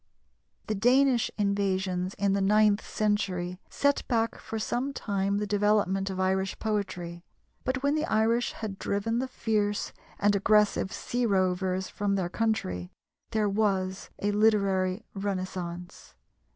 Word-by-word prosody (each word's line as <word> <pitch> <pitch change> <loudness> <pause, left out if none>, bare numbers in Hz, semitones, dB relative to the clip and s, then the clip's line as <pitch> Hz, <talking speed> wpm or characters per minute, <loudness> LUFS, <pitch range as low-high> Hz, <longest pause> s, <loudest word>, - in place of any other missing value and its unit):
The 215 - -1
Danish 245 +3 +3
invasions 190 -2 0
in 200 -1 +1
the 200 - +1
ninth 210 +1 +4
century 185 -4 -1
set 285 0 +1
back 230 -2 0
for 225 - -5
some 245 +5 -2
time 200 -4 -1
the 210 - -1
development 205 -2 +1
of 190 -1 -4
Irish 190 0 0
poetry, 180 -5 -3 0.4
but, 260 +1 -2
when 280 +1 +3
the 310 +1 0
Irish 230 -1 +1
had 205 -3 -6
driven 225 +4 -1
the 260 - -1
fierce 210 -4 -1 0.2
and 205 0 +3
aggressive 210 -1 +3
sea 245 0 -1
rovers 185 -1 +1
from 200 -1 -1
their 185 -3 -1
country, 135 - -1 0.4
there 215 -1 +1
was 195 -2 0
a 205 - 0
literary 200 -2 +2
renascence. 185 -3 -5
200 Hz, 135 wpm, -28 LUFS, 190-220 Hz, 0.4 s, ninth